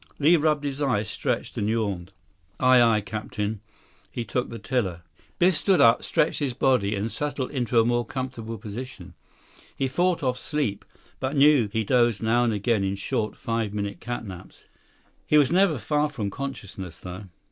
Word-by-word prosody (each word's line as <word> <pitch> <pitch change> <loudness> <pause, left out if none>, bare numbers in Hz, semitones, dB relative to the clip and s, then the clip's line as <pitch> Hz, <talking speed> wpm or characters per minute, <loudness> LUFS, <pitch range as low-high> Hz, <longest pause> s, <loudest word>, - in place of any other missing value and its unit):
Li 155 +4 +5
rubbed 150 -2 +2
his 140 0 -3
eyes, 125 -7 +1
stretched, - - -3
and 105 - 0
yawned. 100 -5 -2 0.5
100 130 - +1
"Aye, 130 -1 +7
aye, 105 - +1
Captain." 105 0 -4 0.5
He 120 - -5
took 125 +1 -2
the 115 - -6
tiller. 95 -5 -2 0.3
Biff 180 +2 +4
stood 160 +4 +3
up, 115 -2 +5
stretched 155 - +1
his 135 -5 -2
body, 110 -7 +2
then 100 +2 -1
settled 140 +1 -3
into 120 -4 +1
a 115 - +4
more 120 0 +1
comfortable 115 -2 -5
position. 105 -3 -8 0.6
He 135 - 0
fought 175 +5 +1
off 125 -1 0
sleep, 145 -10 -2 0.3
but 135 +2 -2
knew 140 -6 +5
he 110 0 0
dozed 120 -1 +2
now 120 +2 +3
and 120 - +2
again 105 0 +1
in 95 0 -1
short, 105 +2 -2
five 115 -3 -2
minute 100 -3 -3
catnaps. 100 -7 -7 0.6
He 150 - +4
was 145 -1 +4
never 180 -4 +3
far 150 +5 0
from 110 -9 -4
consciousness, 100 -10 -7
though. 90 +3 -8
120 Hz, 175 wpm, -25 LUFS, 105-140 Hz, 0.6 s, Aye